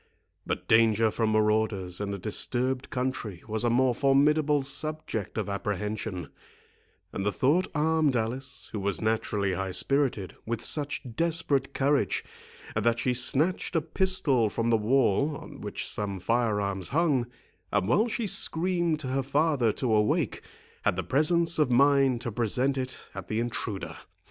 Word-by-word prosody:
But - - -3
danger 110 -1 +4
from 110 0 0
maurauders 105 -4 +1
in 100 0 -2
a 100 - -3
disturbed 125 +6 -1
country 125 - -3
was 110 0 -1
a 120 - +2
more 125 +1 +3
formidable 145 +2 +3
subject 135 -7 -4
of 110 - -1
apprehension, 100 -3 -3 0.8
and 100 - -3
the 105 - +1
thought 145 - +2
armed 155 -2 +2
Alice, 125 +4 -3
who 105 - -3
was 100 -1 -1
naturally 110 -3 0
high 95 +1 -2
spirited, 130 -2 0
with 115 0 -3
such 145 -2 -1
desperate 155 -4 0
courage, 140 -5 +1 0.5
that 120 0 +2
she 125 +2 0
snatched 145 +9 0
a 165 - +3
pistol 145 - +2
from 115 +3 -1
the - - +5
wall, 130 +4 +2
on - - -11
which - - -5
some 100 -2 -3
fire 115 +2 +1
arms 100 -3 -2
hung, 145 -5 +1 0.4
and 100 -2 +1
while 210 - +3
she 230 0 -2
screamed 175 -3 0
to 135 - -5
her 135 +1 0
father 140 -3 +2
to 120 -1 -1
awake, 105 0 +1 0.4
had - - +1
the 95 - -2
presence 165 +4 +2
of 150 -4 +3
mind 135 -1 +4
to 120 - -3
present 125 +5 0
it 130 -1 -5
at - - -7
the 110 - -1
intruder. 100 -7 -4
120 Hz, 155 wpm, -28 LUFS, 105-145 Hz, 0.8 s, the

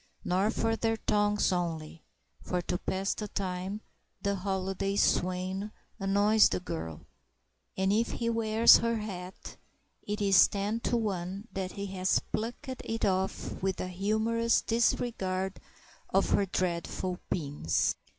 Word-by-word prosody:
Nor 190 +4 +2
from 225 0 0
their 225 0 0
tongues 210 -1 +2
only; 165 -3 -3 0.4
for, 180 - -2
to 180 0 -2
pass 190 +1 -1
the 210 - -5
time, 190 +1 -3 0.4
the 200 - +1
holiday 195 0 -2
swain 185 +2 +1 0.3
annoys 205 +2 +4
the - - -1
girl; 80 - -6 0.7
and 190 +1 +2
if 230 +2 +1
he 230 - -2
wears 225 0 +6
her 230 0 0
hat, 190 -4 -7 0.4
it 210 +1 -4
is 200 -2 +6
ten 205 +3 -2
to 240 +1 0
one 195 -1 -3
that 190 -1 -3
he 200 - -4
has 190 -1 +1
plucked 230 +5 -3 0.2
it 225 0 -2
off 190 0 -1
with 190 0 -1
a 185 - -3
humorous 220 +5 +1
disregard 195 -5 0 0.5
of - - +2
her 200 - +3
dreadful 180 0 -2
pins. 145 - 0
195 Hz, 135 wpm, -30 LUFS, 185-215 Hz, 0.7 s, wears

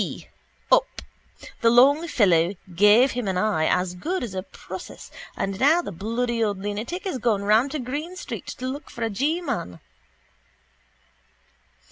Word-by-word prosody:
p: - - -5 0.4
up. - - +5 0.7
The 230 - +5
long 280 +7 +5
fellow 185 - +3 0.2
gave 210 +8 +5
him 245 -3 -3
an 190 -1 -1
eye 185 -5 +1
as 180 0 +1
good 335 - -3
as 225 -6 -5
a 190 - -3
process - - -10 0.3
and 195 0 -3
now 320 +6 +4
the - - -6
bloody 230 +5 -2
old 205 -2 -1
lunatic 210 - -4
is 325 -10 -3
gone 215 -4 +1
round 220 +6 +3
to 305 - -2
Green 290 +8 -5
street - - -7
to 255 - -6
look 280 +3 -6
for 235 - -6
a 225 - -1
G 300 - 0
man. 90 - -4
230 Hz, 160 wpm, -24 LUFS, 195-280 Hz, 0.7 s, up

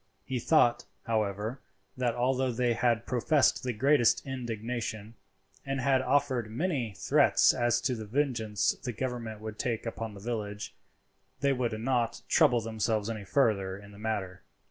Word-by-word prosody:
He 130 -2 -2
thought, 120 -3 +3 0.2
however, 110 +2 -1 0.4
that 125 -2 0
although 130 +1 +1
they 120 0 +1
had 115 -1 +1
professed 135 +3 +2
the 125 - -2
greatest 125 +1 +3
indignation, 115 -3 -4 0.5
and 135 0 -2
had 130 0 +3
offered 130 -4 +1
many 125 - -2
threats - - +4
as 120 0 +2
to 130 - 0
the 110 -3 -5
vengeance 115 -5 0
the 125 - -3
government 115 -3 -4
would 110 0 -7
take 115 -2 -2
upon 115 -2 -5
the - - -9
village, 105 -2 -4 0.7
they 140 0 +3
would 120 -4 -2
not 120 -1 -1
trouble 120 -1 +4
themselves 110 -1 -1
any 105 -3 -6
further 100 -5 +1
in 100 0 -13
the 100 - -14
matter. 95 -4 -3
115 Hz, 150 wpm, -29 LUFS, 110-130 Hz, 0.7 s, threats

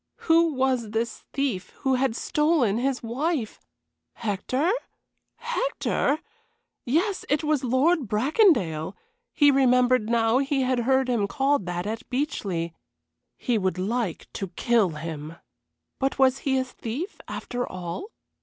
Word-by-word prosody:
Who 330 0 +4
was 260 -4 +1
this 225 +1 -3
thief 250 -10 -2
who 265 - +2
had 255 -2 +1
stolen 300 -8 +2
his 260 0 -1
wife? 255 +1 -2 0.5
Hector? 245 - -1 0.6
Hector? 485 - 0 0.7
Yes, 355 - +1
it 295 +2 +1
was 300 -3 +1
Lord 265 +4 +2
Bracondale; 210 - +2 0.4
he 290 -1 +5
remembered 250 -3 +3
now 230 +1 +3
he 275 -1 +1
had 255 -1 +1
heard 265 +2 +2
him 230 -5 +1
called 275 -4 +1
that 175 +1 -3
at 225 +4 -5
Beechleigh. 200 - -2 0.7
He 235 -3 0
would 185 -1 -1
like 205 -1 -2
to 195 - -4
kill 215 +3 +2
him. 155 0 -6 0.6
But 270 0 0
was 265 -1 +4
he 265 -1 0
a 260 - +2
thief, 260 - -6
after 245 0 -4
all? 180 - -5
250 Hz, 130 wpm, -25 LUFS, 215-280 Hz, 0.7 s, he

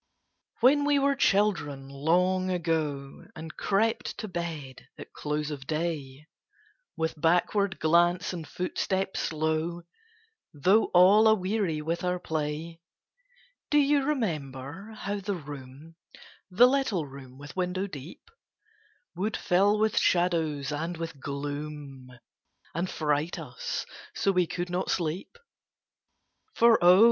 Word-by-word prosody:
When 280 +4 +5
we 290 0 +3
were 280 0 +3
children, 195 - +1
long 180 +7 +1
ago, 155 -6 -2
And 160 0 -8
crept 220 +3 0
to 215 - -5
bed 165 -8 -6
at - - -11
close 150 0 -3
of 135 -2 -7
day, 155 -3 -3 0.7
With 160 -1 -2
backward 190 +4 +2
glance 175 +3 +3
and 165 -4 -6
footstep 190 +1 -2
slow, 160 +2 -1 0.7
Though 190 +10 +4
all 195 +5 +6
aweary 190 -6 +1
with 165 +3 -2
our 180 0 0
play, 160 0 -4 0.9
Do 295 - +3
you 290 0 +4
remember 165 - -3
how 205 -1 -3
the 200 0 -3
room 145 +1 -10 0.5
The 210 +7 +6
little 255 - 0
room 135 -2 -12
with 145 0 -11
window 185 +1 -1
deep 155 - -10 0.9
Would 205 +5 -1
fill 200 +4 +3
with 215 0 +2
shadows 160 -6 +1
and 165 +4 -3
with 165 -3 -6
gloom, 145 -1 -6 0.6
And 175 +3 -2
fright 150 +1 -1
us - - -5 0.3
so 195 - +2
we 180 -2 +2
could 175 +1 -4
not 180 +1 -1
sleep? 175 - -2 1.2
For 235 -5 +5
O! 180 +2 +8
170 Hz, 120 wpm, -28 LUFS, 150-195 Hz, 1.2 s, O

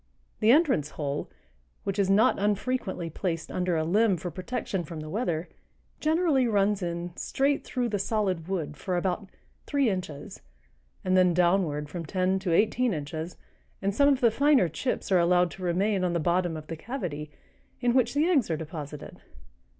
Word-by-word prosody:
The 215 - +3
entrance 260 - +4
hole, 145 -1 -3 0.5
which 195 +1 -2
is 195 -1 +2
not 215 +5 +4
unfrequently 205 -3 -1
placed 165 -1 -3
under 180 -2 0
a 160 - +1
limb 200 +3 +3
for 175 +2 -5
protection 185 +1 -3
from 165 0 -7
the 155 0 -7
weather, 175 -7 -1 0.5
generally 310 -5 +2
runs 205 -2 +2
in 170 0 -4
straight 280 +1 0
through 245 -2 -2
the 205 -2 -1
solid 190 -5 -1
wood 160 -6 -3
for 180 +2 -2
about 190 +2 -2 0.4
three 280 -6 +2
inches, 180 -7 -6 0.6
and 185 0 +2
then 180 -2 +4
downward 170 -4 +2
from 165 +3 -6
ten 185 +3 +1
to 190 -2 -2
eighteen 220 +4 +2
inches, 155 +3 -5 0.4
and 195 +1 -1
some 280 +6 +4
of 275 -2 +2
the 235 -2 +5
finer 280 -4 +4
chips 200 - -3
are 185 - +5
allowed 175 0 +3
to 190 - -9
remain 190 +3 +1
on 180 -1 +1
the 170 - +1
bottom 175 0 +1
of 155 - -8
the 165 - -5
cavity, 160 - -5 0.5
in 245 -1 +2
which 250 0 +2
the 295 +2 +3
eggs 300 - +2
are 160 - 0
deposited. 150 -2 -8
185 Hz, 175 wpm, -27 LUFS, 170-225 Hz, 0.6 s, the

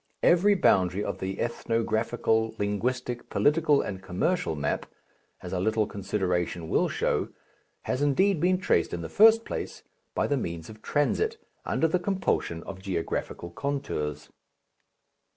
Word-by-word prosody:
Every 195 +4 +5
boundary 95 - +3
of - - -4
the 95 0 -4
ethnographical, 115 -1 0
linguistic, 120 +4 -2
political, 150 -1 +3
and 95 -2 -5
commercial 95 - -1
map 75 -1 -2 0.6
as 90 - -6
a 90 - 0
little 110 +3 +1
consideration 90 -5 -2
will - - +2
show - - 0 0.5
has 130 - -2
indeed 165 +6 +3
been 180 +3 +3
traced 85 - +1
in 85 - -5
the 80 - -5
first 225 +2 +6
place - - -5 0.3
by - - +1
the 145 - +1
means 85 -5 -5
of 110 0 -14
transit, 435 - 0 0.3
under 165 - +2
the 180 +3 +1
compulsion 175 - -1
of 95 -1 -8
geographical 85 -2 -3
contours. 80 - -3
110 Hz, 135 wpm, -27 LUFS, 90-150 Hz, 0.6 s, first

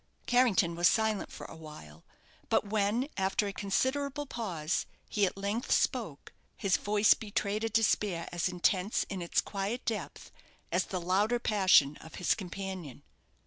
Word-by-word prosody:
Carrington 235 -9 +3
was 170 +1 +4
silent 220 -1 +1
for - - -9
awhile; 150 - -11 0.5
but - - +2
when, 210 +5 0
after 190 +2 +1
a 200 - -3
considerable 275 +9 -1
pause, 185 - -2 0.2
he 205 -2 +2
at 185 - -6
length 200 +4 -2
spoke, 215 - 0 0.2
his 195 -4 +2
voice 205 0 +4
betrayed 210 0 -2
a 225 - 0
despair 210 -5 +1
as 175 +1 0
intense 185 +3 +1
in 195 -2 -4
its 170 - +1
quiet 205 +5 -4
depth 225 -2 -4 0.4
as - - +1
the 185 - -3
louder 195 +7 +1
passion 185 -10 +4
of 160 - -12
his 180 - +2
companion. 185 - -6
200 Hz, 145 wpm, -31 LUFS, 175-220 Hz, 0.5 s, was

